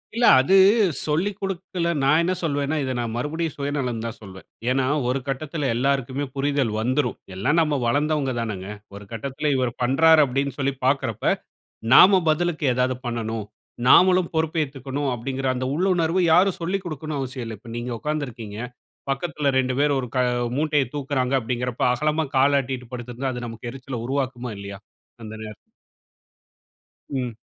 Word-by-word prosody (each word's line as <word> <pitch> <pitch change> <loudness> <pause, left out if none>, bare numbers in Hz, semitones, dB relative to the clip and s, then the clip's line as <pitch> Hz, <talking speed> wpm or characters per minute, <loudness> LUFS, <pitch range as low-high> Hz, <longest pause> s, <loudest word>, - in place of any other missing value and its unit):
இல்ல 235 +1 +3
அது, 140 +9 +3 0.5
சொல்லிக் 180 +7 0
குடுக்கல, 185 -2 -2
நான் 155 +4 +4
என்னா 180 +2 +1
சொல்வேன்னா, 145 -1 -1
இத 130 -1 -2
நான் 115 -1 -3
மறுபடியும் 160 +4 -2
சுயநலம்ன்னு 135 -5 -2
தான் 115 0 -5
சொல்வேன். 95 -2 -11 0.2
ஏன்னா, 130 0 +2 0.2
ஒரு 130 +2 0
கட்டத்தில 145 +1 -2
எல்லாருக்குமே 135 +2 0
புரிதல் 140 -4 0
வந்துரும். 125 +2 0 0.2
எல்லாம் 135 - +1
நம்ம 150 -2 +1
வளந்தவங்க 145 +2 +1
தானேங்க. 100 -5 -4 0.3
ஒரு 100 - -9
கட்டத்தில 135 +6 -2
இவரு 130 -2 0
பண்றாரு 160 +5 +5
அப்படின்னு 140 +1 -1
சொல்லி 140 -1 0
பாக்கிறப்ப, 130 -4 0 0.7
நாம 190 +3 +8
பதிலுக்கு 155 0 0
ஏதாவது 125 +1 0
பண்ணணும், 115 -2 -3 0.4
நாமளும் 185 +3 +6
பொறுப்பேத்துக்கணும் 145 -4 -1
அப்டிங்கற 130 +2 -3
அந்த 130 +1 -2
உள்ளுணர்வு 175 0 +2
யாரும் 185 +3 +4
சொல்லிக் 190 +3 -2
கொடுக்கணும்னு 155 -2 -4
அவசியமில்ல. 125 -5 -5
இப்ப 115 0 -12
நீங்க 120 +1 -4
உக்காந்துருக்கீங்க, 125 -9 -4 0.5
பக்கத்தில 145 0 -1
2 130 -1 +1
பேரு 145 0 +3
ஒரு 125 - -6
க - - +3 0.4
மூட்டைய 150 -2 +2
தூக்குகிறாங்க 135 -2 -1
அப்டிங்கிறப்போ, 125 +1 -1
அகலமா 150 +5 0
கால 140 +2 +4
ஆட்டிட்டு 125 -1 -6
படுத்திருந்தா, 125 +2 -4
அது 120 0 -5
நமக்கு 115 +1 -7
எரிச்சல 130 -2 -6
உருவாக்குமா? 130 -3 -2
இல்லயா? 100 -1 -8 0.4
அந்த 110 - -8
நேரத்தில. 110 -1 -8 1.5
ம். 125 -4 -3
135 Hz, 145 wpm, -23 LUFS, 125-155 Hz, 1.5 s, நாம